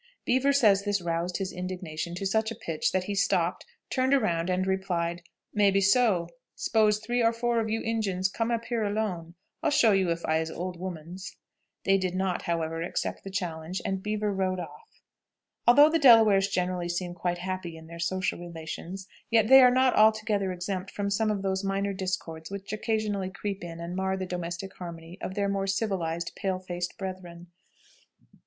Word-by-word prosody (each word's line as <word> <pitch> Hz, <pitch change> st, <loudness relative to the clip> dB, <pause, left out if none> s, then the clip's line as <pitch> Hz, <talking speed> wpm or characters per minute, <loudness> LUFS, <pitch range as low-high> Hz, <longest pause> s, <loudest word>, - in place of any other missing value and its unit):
Beaver 260 Hz, +3 st, +3 dB
says 215 Hz, -8 st, +5 dB
this 205 Hz, -1 st, 0 dB
roused 170 Hz, +1 st, -2 dB
his 195 Hz, -1 st, -3 dB
indignation 180 Hz, -2 st, -5 dB
to 195 Hz, -, -4 dB
such 220 Hz, +3 st, +1 dB
a 230 Hz, -, -5 dB
pitch 165 Hz, -8 st, -2 dB
that 185 Hz, -1 st, 0 dB
he 205 Hz, -, -3 dB
stopped, 200 Hz, +2 st, +1 dB, 0.2 s
turned 260 Hz, +1 st, +3 dB
around, 175 Hz, -9 st, +1 dB
and 185 Hz, +1 st, +1 dB
replied, 175 Hz, -3 st, -1 dB, 0.3 s
"Maybe 200 Hz, -1 st, +4 dB
so; 200 Hz, -3 st, +3 dB, 0.3 s
s'pose 215 Hz, -1 st, +2 dB
three 240 Hz, +3 st, -1 dB
or 230 Hz, 0 st, +4 dB
four 235 Hz, 0 st, 0 dB
of 220 Hz, -1 st, -1 dB
you 225 Hz, +1 st, -1 dB
Injuns 200 Hz, -5 st, 0 dB
come 225 Hz, +4 st, -2 dB
up 230 Hz, -1 st, -1 dB
here 235 Hz, -3 st, -1 dB
alone, 200 Hz, -5 st, -2 dB, 0.3 s
I'll -, -, +2 dB
show 240 Hz, -6 st, +5 dB
you 190 Hz, -3 st, +2 dB
if 170 Hz, 0 st, -2 dB
I'ze 160 Hz, 0 st, +1 dB
old 180 Hz, +1 st, -5 dB
womans." 180 Hz, +2 st, -7 dB, 0.5 s
They 195 Hz, 0 st, +3 dB
did 185 Hz, -1 st, -2 dB
not, 185 Hz, -1 st, 0 dB
however, 165 Hz, -2 st, -2 dB
accept 170 Hz, -, -3 dB
the 195 Hz, -, -6 dB
challenge, 175 Hz, -2 st, -3 dB
and 190 Hz, -1 st, -1 dB
Beaver 210 Hz, 0 st, -1 dB
rode 185 Hz, -1 st, 0 dB
off. 445 Hz, -, -11 dB, 0.6 s
Although 290 Hz, +6 st, +8 dB
the 330 Hz, -, +2 dB
Delawares 220 Hz, -7 st, +7 dB
generally 180 Hz, -2 st, -1 dB
seem 175 Hz, 0 st, -2 dB
quite 175 Hz, 0 st, -2 dB
happy 180 Hz, -2 st, -4 dB
in 160 Hz, -, -12 dB
their 170 Hz, +1 st, -10 dB
social 180 Hz, +2 st, -1 dB
relations, 175 Hz, +2 st, -7 dB, 0.2 s
yet 225 Hz, -1 st, +3 dB
they 265 Hz, 0 st, +10 dB
are 250 Hz, -, +8 dB
not 255 Hz, 0 st, +3 dB
altogether 215 Hz, -2 st, +3 dB
exempt 185 Hz, +1 st, -4 dB
from 200 Hz, 0 st, -3 dB
some 215 Hz, +2 st, +1 dB
of 205 Hz, -2 st, -1 dB
those 190 Hz, 0 st, -1 dB
minor 195 Hz, 0 st, -1 dB
discords 180 Hz, -4 st, -4 dB
which 200 Hz, +1 st, -6 dB
occasionally 215 Hz, -3 st, -1 dB
creep 195 Hz, 0 st, -5 dB
in 165 Hz, -1 st, -7 dB
and 170 Hz, +1 st, -5 dB
mar 190 Hz, 0 st, 0 dB
the 190 Hz, -, -3 dB
domestic 180 Hz, +1 st, -5 dB
harmony 170 Hz, 0 st, -8 dB
of 185 Hz, -, -5 dB
their 200 Hz, -1 st, +1 dB
more 195 Hz, 0 st, -1 dB
civilized 190 Hz, -5 st, -1 dB
pale 190 Hz, -2 st, -1 dB
faced 175 Hz, -1 st, -5 dB
brethren. 180 Hz, -3 st, -7 dB
190 Hz, 185 wpm, -28 LUFS, 175-210 Hz, 0.6 s, they